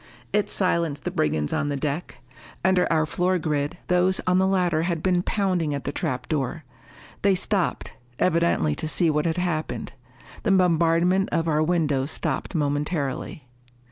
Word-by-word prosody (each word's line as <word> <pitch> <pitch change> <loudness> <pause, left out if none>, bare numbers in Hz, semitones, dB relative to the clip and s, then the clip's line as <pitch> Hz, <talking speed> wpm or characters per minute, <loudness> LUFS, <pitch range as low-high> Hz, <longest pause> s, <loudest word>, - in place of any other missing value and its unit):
It 210 -1 +1
silenced 170 -6 0
the 180 - -2
brigands 155 - 0
on 145 - 0
the 145 - -1
deck. 145 +2 -4 0.4
Under 185 -2 +3
our 160 -1 +3
floor 180 +4 0
grid, 150 -2 -2
those 180 +1 +2
on 180 0 +3
the 190 - +3
ladder 180 -4 +2
had 170 -1 -2
been 180 -2 +2
pounding 180 -7 0
at 140 - -5
the 140 - -2
trap 130 -6 -3
door. 155 +1 -2 0.6
They 195 -1 +4
stopped, 190 0 -1 0.2
evidently 170 - +2
to 155 - -4
see 165 +1 +2
what 150 +1 0
had 160 - -1
happened. 170 -4 -2 0.5
The 205 - +2
bombardment 175 +1 +3
of 165 0 0
our 155 -1 +2
windows 155 -5 +1
stopped 175 - -3
momentarily. 145 -2 -2
165 Hz, 160 wpm, -24 LUFS, 150-180 Hz, 0.6 s, They